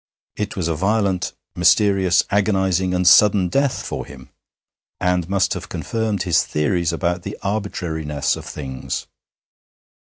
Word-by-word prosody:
It 105 Hz, -1 st, -4 dB
was 90 Hz, -3 st, -1 dB
a 85 Hz, -, 0 dB
violent, 95 Hz, +1 st, 0 dB, 0.2 s
mysterious, 95 Hz, -4 st, +3 dB
agonizing, 95 Hz, -3 st, +1 dB
and 90 Hz, 0 st, +1 dB
sudden 100 Hz, -1 st, +6 dB
death 140 Hz, +5 st, 0 dB
for -, -, -4 dB
him, 65 Hz, -1 st, -13 dB, 0.7 s
and 90 Hz, -1 st, 0 dB
must 100 Hz, -1 st, +1 dB
have -, -, -7 dB
confirmed 110 Hz, -4 st, -2 dB
his 85 Hz, -6 st, +2 dB
theories 80 Hz, +3 st, 0 dB
about 85 Hz, +1 st, -1 dB
the -, -, -7 dB
arbitrariness 80 Hz, -8 st, -2 dB
of -, -, -9 dB
things. 65 Hz, -1 st, -5 dB
90 Hz, 130 wpm, -21 LUFS, 85-100 Hz, 0.7 s, sudden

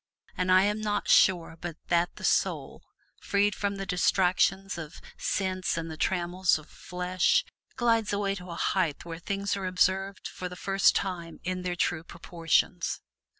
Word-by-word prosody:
And 185 Hz, 0 st, 0 dB
I 185 Hz, +1 st, +6 dB
am 210 Hz, +1 st, 0 dB
not 205 Hz, -1 st, -1 dB
sure 175 Hz, -4 st, +4 dB
but 170 Hz, -2 st, -5 dB
that 170 Hz, 0 st, +2 dB
the -, -, -11 dB
soul, -, -, 0 dB, 0.4 s
freed 205 Hz, +1 st, +2 dB
from 200 Hz, -1 st, -2 dB
the 195 Hz, 0 st, -4 dB
distractions 190 Hz, +1 st, +2 dB
of 160 Hz, 0 st, -8 dB, 0.2 s
sense 185 Hz, -3 st, -1 dB
and 165 Hz, 0 st, -4 dB
the -, -, -6 dB
trammels 180 Hz, +2 st, +1 dB
of 155 Hz, -, -13 dB
flesh, 180 Hz, -, 0 dB, 0.3 s
glides 230 Hz, -3 st, +2 dB
away 200 Hz, -1 st, 0 dB
to 180 Hz, -2 st, -8 dB
a 170 Hz, -, -5 dB
height 170 Hz, -4 st, 0 dB
where 165 Hz, -1 st, -6 dB
things 200 Hz, +3 st, -2 dB
are 195 Hz, -2 st, -3 dB
observed 190 Hz, +1 st, +1 dB
for 180 Hz, -, -6 dB
the 180 Hz, -, -8 dB
first 195 Hz, +2 st, +3 dB
time 175 Hz, -4 st, -3 dB
in 185 Hz, +1 st, -2 dB
their 180 Hz, -1 st, -2 dB
true 165 Hz, -2 st, 0 dB
proportions. 170 Hz, -1 st, -1 dB
185 Hz, 165 wpm, -28 LUFS, 175-195 Hz, 0.4 s, I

